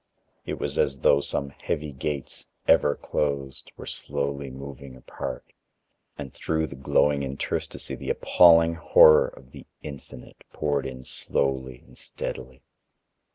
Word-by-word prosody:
It - - -4
was - - -3
as 65 -1 +1
though 70 - +5
some 70 -1 -3
heavy 75 +2 -4
gates, 70 0 -5 0.2
ever 75 - +4
closed, 70 -2 -3
were - - -9
slowly 70 -1 -3
moving 70 0 -9
apart, 65 - -7 0.6
and 70 -3 -7
through 80 0 -1
the 70 - -9
growing 70 +2 +2
interstice 70 0 -4
the - - -7
appalling 85 -1 +5
horror 80 -1 +6
of 65 0 -14
the - - -12 0.2
Infinite 70 -4 -11
poured 70 -3 -1
in 65 -1 -9
slowly 65 -2 -1
and - - -14
steadily. 65 +1 -6
70 Hz, 130 wpm, -26 LUFS, 65-75 Hz, 0.6 s, horror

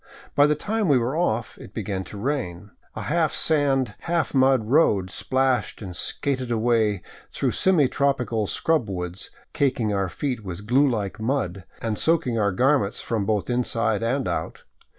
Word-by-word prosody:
By 145 0 +5
the 150 - +2
time 215 +6 -1
we 140 -4 +5
were 125 +4 -1
off, 120 -10 -1
it - - -12
began 100 -3 -3
to 105 - -9
rain. 105 -6 -3 0.2
A 110 - -4
half 160 +6 +1
sand, 135 -7 +2
half 170 -2 -1
mud 130 -4 +4
road 105 - +3
splashed 130 -3 0
and 95 -5 -7
skated 130 +5 -1
away 110 -4 +1 0.3
through - - -1
semi 175 -8 +3
tropical 125 -6 0
scrub 155 -5 0
woods, 90 -1 -5 0.2
caking 120 -6 +1
our 95 -2 0
feet 125 - -3
with 95 +1 -7
glue 135 +5 +4
like 105 -3 -3
mud, 110 -7 -2 0.2
and 110 -2 -2
soaking 140 -8 +1
our 100 -1 +2
garments 125 0 +2
from 110 -4 -2
both 105 -2 0
inside 115 -3 0
and 130 +4 0
out. - - -3
120 Hz, 165 wpm, -24 LUFS, 105-140 Hz, 0.3 s, By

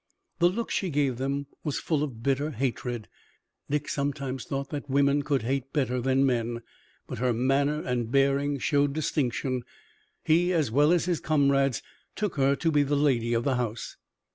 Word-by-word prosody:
The 175 0 +5
look 230 +6 -3
she 190 - 0
gave 140 -5 0
them 140 +1 -1 0.2
was 150 -3 -2
full 155 -3 0
of 125 -7 -4
bitter 140 +3 +1
hatred 120 -4 -3 0.6
Dick 145 0 -1
sometimes 140 -3 -3
thought 140 0 -4
that 145 -1 -5
women 140 +1 +3
could 140 -4 0
hate 135 +2 -2
better 125 -4 0
than 135 +2 +2
men 120 -2 -1 0.4
but - - -6
her 125 0 +2
manner 140 +5 +1
and 120 -2 -2
bearing 140 +1 +2
showed 145 +1 +1
distinction. 130 -4 -1 0.6
He, 175 +3 +3
as 155 -9 +1
well 145 +6 +4
as 175 -1 +3
his 175 -3 0
comrades, 140 -4 +2 0.3
took 210 -4 -2
her 140 0 +3
to 165 +3 0
be 145 -1 +4
the 145 +1 +1
lady 120 -5 +2
of 115 - +1
the 130 -1 +1
house. 120 -2 -3
140 Hz, 175 wpm, -27 LUFS, 125-145 Hz, 0.6 s, The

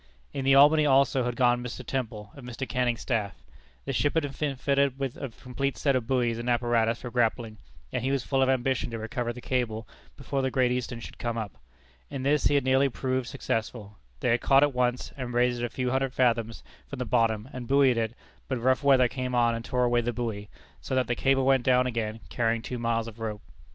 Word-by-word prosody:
In 135 -1 -3
the 135 0 +5
Albany, 150 +3 +7
also, 135 -2 +3
had 120 -1 -2
gone 120 -1 +2
Mr. 125 +1 -7
Temple, 110 -5 -4
of 140 - -12
Mr. 125 +2 -5
Canning's 125 -2 0
staff. 110 -6 -1 0.5
The - - -2
ship 145 +4 +1
had 160 - +2 0.2
been 145 -3 -1
fitted 140 +1 +1
up - - -24
with 135 -3 -3
a 140 - -5
complete 125 +4 -4
set 140 -2 +1
of 120 -3 -1
buoys 120 -3 +1
and 120 +1 -3
apparatus 120 -1 +1
for 125 - -6
grappling; 115 -2 0 0.3
and - - -1
he 130 - 0
was 135 -2 0
full 135 -1 0
of 130 - +3
ambition 130 -1 0
to 115 - -5
recover 120 +2 -3
the 120 +1 -9
cable 115 -4 -2 0.3
before 140 0 -2
the 130 - 0
Great 130 -1 +2
Eastern 125 -1 -3
should - - -10
come 120 -1 -2
up. 110 -4 -4 0.6
In 135 -2 -5
this 145 +2 +2
he 145 - +4
had 140 - +3
nearly 130 +1 +3
proved 130 -1 -2
successful. 110 -3 -4 0.2
They - - +1
had 115 +1 +2
caught 135 +1 +5
it 145 -1 +2
once, 125 0 0
and 125 -2 -5
raised 120 0 +2
it - - 0
a - - -4
few 125 +1 -2
hundred 135 0 0
fathoms 115 -3 +1 0.2
from 140 - -7
the 125 - -3
bottom, 115 -1 +1
and 125 -2 -6
buoyed 135 -2 +4
it, 115 0 -1 0.3
but 130 - -1
rough 130 +3 +2
weather 135 -3 +5
came 125 0 -3
on 120 -1 +3
and 115 0 -4
tore 125 +1 0
away 120 0 +2
the 120 +1 -1
buoy, 110 -3 -4 0.3
so 130 - -3
that 130 -1 +2
the 120 - -1
cable 135 +2 +2
went 135 -1 +4
down 125 0 +3
again, 115 -2 -3
carrying 115 -1 0
two 125 - -5
miles 115 -1 0
of 115 0 -10
rope. 110 -2 -5
125 Hz, 230 wpm, -27 LUFS, 115-135 Hz, 0.6 s, Albany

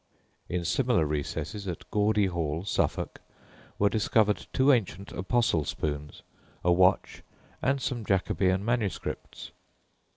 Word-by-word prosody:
In 90 -1 -2
similar 115 0 +2
recesses 75 +7 -3
at 85 -3 -5
Gawdy 105 0 +3
Hall, 85 -2 -2
Suffolk, - - -1 0.6
were 100 - +3
discovered 110 0 +2
two 135 +2 +4
ancient 100 -4 -1
apostle 95 -4 +1
spoons, 75 0 -4 0.4
a 90 - +3
watch, 90 +1 +3 0.4
and 140 +1 +1
some 125 -3 -3
Jacobean 95 0 +1
MSS. 115 -4 -3
95 Hz, 110 wpm, -28 LUFS, 85-110 Hz, 0.6 s, two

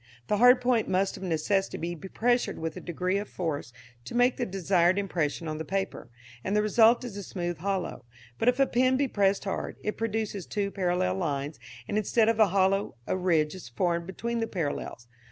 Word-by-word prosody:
The 210 - +2
hard 245 +3 +7
point 245 -3 +2
must 190 +1 +1
of - - -10
necessity 190 +3 0 0.2
be 180 +3 -9
pressed 240 +4 +1
with 160 -1 -4
a - - -6
degree 180 +3 -1
of 205 - -6
force 155 -9 -3 0.3
to - - -7
make 245 +1 +4
the 245 - -1
desired 185 -1 +2
impression 170 -5 -1
on 155 0 -4
the - - -2
paper, 195 -4 -3 0.3
and 195 - -1
the 210 - +3
result 225 +3 +5
is 240 -5 -6
a - - -4
smooth 175 -3 -4
hollow. 185 -8 -3 0.3
But 230 - +4
if 250 +2 0
a 275 - +6
pen 255 +1 +2
be 280 0 +1
pressed 200 -4 +1
hard, 195 -2 -4
it 210 - -2
produces 220 -4 -2
two 200 -1 -2
parallel 175 - 0
lines, 140 +4 -2 0.3
and, 210 - 0
instead 220 +2 +2
of 225 -1 +1
a 215 - +7
hollow, 195 -2 +1
a - - -1
ridge 165 -5 +1
is 185 -10 -9
formed 170 +6 -1
between 235 +5 -3
the 225 - -1
parallels. 145 - -4
195 Hz, 205 wpm, -28 LUFS, 170-220 Hz, 0.3 s, hard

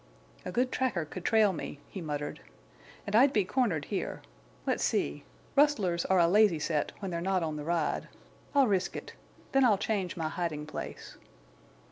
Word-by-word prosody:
"A - - -3
good 250 +1 +1
tracker 225 -11 0
could 175 +4 -8
trail 215 -2 +4
me," 150 -3 -6
he 190 - -7
muttered. 150 -2 -4 0.6
"And 205 -1 -2
I'd 265 +5 +6
be 205 -7 +2
cornered 185 - 0
here. 200 - -4 0.4
Let's - - 0
see. - - 0 0.3
Rustlers 215 - +3
are 190 - +3
a 170 -1 +5
lazy 205 -1 +5
set 150 -1 -1
when 195 -3 -5
they're 170 0 -2
not 185 -1 +1
on 155 -1 -2
the 150 - -5
ride. 165 0 -1 0.5
I'll 280 -1 +6
risk 190 -5 0
it. - - -7 0.4
Then 270 0 +4
I'll 220 -5 +5
change 200 -4 -2
my 160 -2 -1
hiding 155 -3 -3
place." 155 - -7
185 Hz, 175 wpm, -30 LUFS, 165-220 Hz, 0.6 s, I'd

